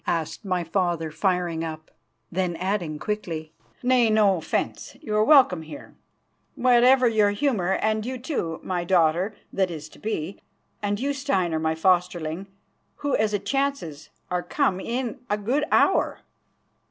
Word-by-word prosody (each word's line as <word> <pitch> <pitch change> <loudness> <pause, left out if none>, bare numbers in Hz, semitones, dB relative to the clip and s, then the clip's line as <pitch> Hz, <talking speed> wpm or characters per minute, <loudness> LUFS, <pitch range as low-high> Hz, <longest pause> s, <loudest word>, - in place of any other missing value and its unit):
asked 165 +5 -2
my 185 -3 -1
father, 170 -2 -1
firing 175 -2 0
up, 155 -1 -7 0.4
then 180 -1 -1
adding 180 -3 -2
quickly: 160 -3 -4 0.3
"Nay, 250 -2 +4
no 210 -3 +4
offence; 160 - -3
you 215 -9 -4
are 215 - +4
welcome 255 - +5
here, 160 -1 -10 0.6
whatever 250 +1 +5
your 215 -3 +3
humour, 205 -4 0
and 215 +1 0
you 255 +3 -4
too, 240 - -3
my 180 -2 -2
daughter 175 +3 +2 0.2
that 190 -2 +1
is 155 -3 -7
to - - -17
be, 200 -4 -4 0.4
and 205 0 -1
you, 280 +3 0
Steinar, 190 - 0
my 160 0 0
fosterling, 175 0 0 0.5
who, 285 -2 -1
as 215 -1 +1
it 205 -1 -2
chances, 275 - -2 0.2
are 180 0 0
come 190 +2 0
in 245 +4 -3
a 210 - +1
good 250 +9 0
hour." - - +3
190 Hz, 150 wpm, -25 LUFS, 170-230 Hz, 0.6 s, welcome